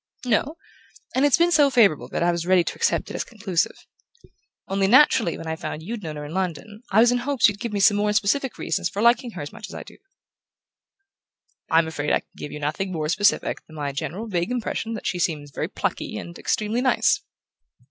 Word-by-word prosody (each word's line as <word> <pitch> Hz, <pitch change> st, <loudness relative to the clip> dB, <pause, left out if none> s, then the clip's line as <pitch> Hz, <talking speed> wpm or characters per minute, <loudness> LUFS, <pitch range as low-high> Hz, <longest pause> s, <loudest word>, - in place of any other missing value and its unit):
"No; 260 Hz, +7 st, 0 dB, 0.6 s
and 265 Hz, +2 st, +3 dB
it's 285 Hz, -, +4 dB
been 340 Hz, +1 st, +3 dB
so 295 Hz, -4 st, +5 dB
favourable 200 Hz, -, +3 dB
that -, -, -1 dB
I 175 Hz, -, +3 dB
was 170 Hz, 0 st, -3 dB
ready 185 Hz, -1 st, +5 dB
to -, -, -3 dB
accept -, -, 0 dB
it -, -, -6 dB
as -, -, -2 dB
conclusive. 200 Hz, -7 st, -2 dB, 0.8 s
Only, 195 Hz, 0 st, +1 dB
naturally, 235 Hz, -, +5 dB
when -, -, -8 dB
I 160 Hz, 0 st, -2 dB
found 155 Hz, -1 st, -6 dB
you'd 225 Hz, +5 st, -5 dB
known 155 Hz, -4 st, -6 dB
her 150 Hz, 0 st, -6 dB
in 150 Hz, -, -8 dB
London 190 Hz, +3 st, -4 dB
I 210 Hz, +3 st, +5 dB
was 240 Hz, +1 st, +5 dB
in 245 Hz, -, +1 dB
hopes 270 Hz, -1 st, +3 dB
you'd 205 Hz, -2 st, -3 dB
give 235 Hz, -2 st, -4 dB
me 205 Hz, -, -2 dB
some 205 Hz, +1 st, +5 dB
more 210 Hz, 0 st, +1 dB
specific 220 Hz, +6 st, 0 dB
reasons -, -, -1 dB
for 200 Hz, -, -6 dB
liking 235 Hz, +2 st, +3 dB
her -, -, -6 dB
as 145 Hz, -, -8 dB
much 210 Hz, -, -9 dB
as -, -, -9 dB
I -, -, -6 dB
do." -, -, -15 dB, 1.7 s
"I'm 165 Hz, 0 st, +4 dB
afraid 150 Hz, -2 st, -3 dB
I -, -, +2 dB
can -, -, -43 dB
give 150 Hz, -, -7 dB
you 150 Hz, -, -6 dB
nothing 155 Hz, +6 st, -2 dB
more 155 Hz, -3 st, -2 dB
specific 205 Hz, +4 st, +1 dB
than 155 Hz, -, -14 dB
my 145 Hz, -2 st, -3 dB
general 180 Hz, +9 st, -4 dB
vague 175 Hz, -3 st, -1 dB
impression 230 Hz, -2 st, -3 dB
that -, -, -8 dB
she 180 Hz, -, -1 dB
seems 150 Hz, -4 st, -2 dB
very -, -, -3 dB
plucky -, -, -3 dB
and 170 Hz, -, -8 dB
extremely 215 Hz, +3 st, -1 dB
nice." 255 Hz, -1 st, +2 dB
200 Hz, 220 wpm, -23 LUFS, 165-235 Hz, 1.7 s, so